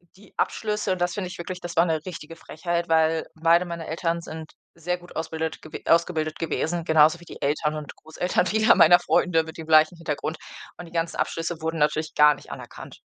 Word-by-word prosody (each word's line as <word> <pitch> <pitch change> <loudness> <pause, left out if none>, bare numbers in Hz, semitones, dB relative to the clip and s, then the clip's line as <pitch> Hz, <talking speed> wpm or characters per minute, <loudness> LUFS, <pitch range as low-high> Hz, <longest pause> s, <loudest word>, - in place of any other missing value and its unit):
die 200 +1 -19
Abschlüsse 210 -3 -1
und 180 - -5
das 175 -1 +1
finde 190 -3 -3
ich 180 - -9
wirklich 180 +1 -6
das 175 -1 -7
war 170 +1 +5
'ne 160 -1 -1
richtige 165 -3 -8
Frechheit, 170 +1 -3
weil 160 0 +2
beide 170 +2 +3
meiner 170 -2 -6
Eltern 170 +1 -2
sind 160 -1 -9 0.2
sehr 180 +2 -2
gut 175 0 -16
ausbildet 160 -1 -4
gew 155 - -12 0.2
ausgebildet 155 -2 +1
gewesen, 165 +1 -2
genauso 160 +2 +4
wie 175 - -15
die - - -12
Eltern 150 +2 0
und 150 -1 -7
Großeltern 180 +3 -1
vieler 215 +3 +4
meiner 175 +2 +7
Freunde 165 -3 +2
mit 160 +1 -10
dem 160 -1 -8
gleichen 155 +2 +5
Hintergrund. 160 -1 -4 0.4
Und 175 - -8
die 165 - -14
ganzen 165 0 -2
Abschlüsse 165 0 -2
wurden 160 0 -2
natürlich 155 +1 0
gar 150 -1 +6
nicht - - -14
anerkannt. - - -10
165 Hz, 205 wpm, -24 LUFS, 160-175 Hz, 0.4 s, meiner